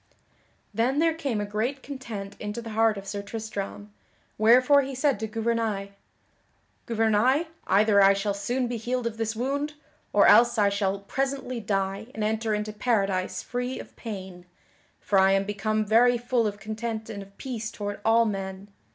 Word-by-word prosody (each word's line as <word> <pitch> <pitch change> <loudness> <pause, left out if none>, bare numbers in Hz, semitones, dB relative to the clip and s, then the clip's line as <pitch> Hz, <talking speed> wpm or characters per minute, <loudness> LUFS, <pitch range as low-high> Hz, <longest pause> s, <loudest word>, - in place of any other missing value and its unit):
Then 245 +5 +1
there 325 +1 +3
came 275 -9 -2
a 205 - -1
great 225 +7 -2
content 225 -8 -7
into 210 +2 -4
the 230 -1 -7
heart 220 -1 +2
of 195 - -7
Sir 200 +1 -4
Tristram, 205 -1 -6 0.4
wherefore 250 +6 +5
he 270 0 -5
said 270 -3 +1
to 220 - -3
Gouvernail: 220 -2 -1 1.0
"Gouvernail, 230 +6 +2 0.2
either 200 +1 +4
I 195 0 +7
shall 200 +1 -1
soon 245 +6 -1
be 240 0 -3
healed 245 +2 -2
of 230 -1 -3
this 225 0 -2
wound, 285 +5 -2 0.4
or - - +5
else 240 0 +6
I 205 -1 +4
shall 200 -1 -1
presently 265 +2 -2
die 195 0 -2
and 220 - -2
enter 220 0 0
into 210 0 -3
Paradise 195 -5 0
free 250 +1 -3
of - - -11
pain, 190 -5 -8 0.5
for 195 - +2
I 190 0 +5
am 195 0 +2
become 215 +1 -1
very 240 +3 +4
full 240 -1 +1
of 205 0 -5
content 220 +1 -4
and 210 -3 -6
of 195 0 -14
peace 230 -5 -4
toward 205 -3 -5
all 230 +1 +4
men." 195 -1 -4
220 Hz, 170 wpm, -26 LUFS, 200-240 Hz, 1.0 s, I